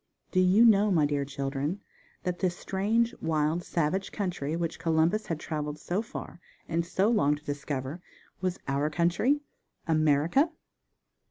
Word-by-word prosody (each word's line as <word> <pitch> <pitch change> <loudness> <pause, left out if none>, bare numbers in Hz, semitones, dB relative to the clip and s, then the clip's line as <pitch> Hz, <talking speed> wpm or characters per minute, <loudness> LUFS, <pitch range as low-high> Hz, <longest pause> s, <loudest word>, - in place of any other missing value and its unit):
Do 185 - +2
you 185 +5 +6
know, 210 -2 +5
my 165 -6 +3
dear 145 -1 0
children, 140 +5 -3 0.4
that 180 -1 -2
this 180 -2 0
strange, 220 +5 +1
wild 155 +1 +1
savage 170 +4 -1
country 175 -7 -2
which 165 -1 -3
Columbus 165 +5 +1
had 165 -2 -2
traveled 150 -2 -4
so 175 +6 -2
far 225 - -8 0.3
and 165 +1 0
so 185 +4 +1
long 205 -11 +3
to 150 +1 -14
discover 145 +2 -4 0.4
was 185 -1 -1
_our 140 +2 0
country, 175 - +2 0.5
America? 155 - +3
165 Hz, 145 wpm, -28 LUFS, 150-190 Hz, 0.5 s, you